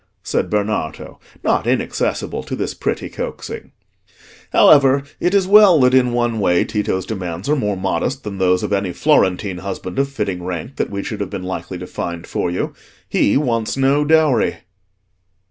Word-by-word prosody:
said - - -1
Bernardo, 105 -7 -3 0.2
not - - +1
inaccessible - - -1
to - - -5
this - - -3
pretty - - -3
coaxing. - - -7 0.8
"However, 140 -2 +5 0.2
it 180 +3 +1
is 195 -2 +3
well 200 -4 +7
that 125 0 +4
in 125 -2 +4
one 120 -2 0
way 90 -3 +3
Tito's 100 -3 -2
demands 90 -4 -5
are 150 - +3
more 105 -8 -1
modest 95 +9 -2
than 100 -2 -6
those 90 -1 +2
of - - -2
any 100 -3 -1
Florentine 95 +1 +1
husband 95 +2 -5
of 140 0 +1
fitting 105 -9 -3
rank 90 - -5
that - - -1
we 100 -1 -4
should 110 - -5
have 100 -2 -3
been 90 - -5
likely 95 0 -5
to 90 - -7
find 85 -1 -5
for - - -2
you; 90 - -3 0.4
he 100 - +2
wants 115 -5 -1
no 135 +2 +3
dowry." 155 -3 +2
105 Hz, 170 wpm, -19 LUFS, 90-135 Hz, 0.8 s, well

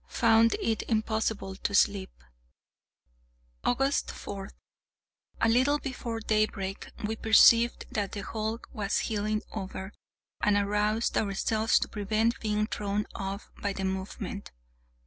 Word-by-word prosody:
Found 230 -1 +4
it 225 -1 0
impossible 220 -3 -1
to 200 - -2
sleep. 200 -2 +3 1.5
August 270 +3 +1
4. 195 -1 -7 0.9
A - - +4
little 260 +6 +4
before 245 -5 -4
daybreak 215 -3 -1 0.2
we 220 +1 -1
perceived 230 +2 +5
that 205 -2 -2
the 205 - -4
hulk 220 +3 -4
was 205 -3 -1
heeling 215 0 -1
over, 190 -1 -5 0.5
and 210 -1 +3
aroused 210 +2 +1
ourselves 220 +2 +1
to - - 0
prevent 215 +3 0
being 210 -1 0
thrown 210 -1 -2
off 195 +1 -5
by 200 -1 -1
the 195 0 -3
movement. 190 +1 -4
215 Hz, 120 wpm, -29 LUFS, 200-225 Hz, 1.5 s, perceived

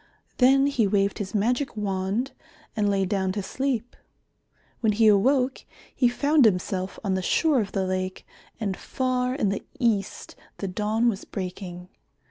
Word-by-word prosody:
Then 270 +2 +5
he 250 -7 +2
waved 200 0 +1
his 205 0 -4
magic 240 +4 0
wand 200 +5 -1 0.4
and 210 -2 +1
lay 195 -1 +1
down 190 -1 0
to 205 -1 -3
sleep. 250 +1 -2 0.8
When 220 -3 +2
he 225 +2 +3
awoke, 255 +6 +3 0.3
he 250 - +3
found 285 +4 +3
himself 185 -2 +1
on 195 -3 0
the 190 - 0
shore 290 - +2
of 200 -2 -5
the 190 -1 0
lake, 185 0 -3 0.3
and 200 -4 -2
far 255 +2 -1
in 210 -8 +1
the 195 - -3
east 215 -6 -1 0.2
the 195 - -4
dawn 215 +5 0
was 215 -4 0
breaking. 180 -2 -6
210 Hz, 155 wpm, -25 LUFS, 195-250 Hz, 0.8 s, Then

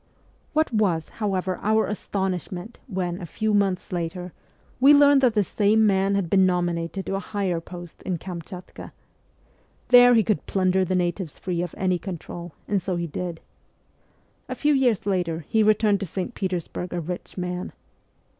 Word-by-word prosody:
What 310 -4 +1
was, 185 -7 +1
however, 190 -3 -1
our 220 +1 +2
astonishment 190 0 -4
when, 180 -1 -3
a 175 - -6
few 215 +5 -1
months 195 -3 +1
later, 175 0 -4 0.5
we 280 +3 +8
learned 285 -1 +6
that 245 -4 +3
this 205 -3 +2
same 215 +1 +3
man 195 -1 +2
had 195 -3 0
been 190 +3 +4
nominated 175 0 0
to - - -3
a 195 - 0
higher 190 -4 -2
post 175 0 -10
in 185 -2 -2
Kamchatka! 180 +1 -9 1.0
There 245 0 +8
he 225 - +5
could 215 0 -1
plunder 190 -1 +2
the 185 +1 -1
natives 175 -1 -2
free 175 -2 -2
of 175 -2 -5
any 185 -2 +1
control, 175 -2 -7
and 200 -1 +1
so 185 +1 -2
he 170 0 -2
did. 170 +1 -5 1.1
A - - -3
few 295 0 +2
years 250 -8 +2
later 175 -5 -1
he 220 - +2
returned 210 -1 +3
to 195 - -4
St. 185 +7 -4
Petersburg 180 -2 -4
a 175 - -1
rich 175 +3 -6
man. 180 0 -3
185 Hz, 165 wpm, -24 LUFS, 175-210 Hz, 1.1 s, we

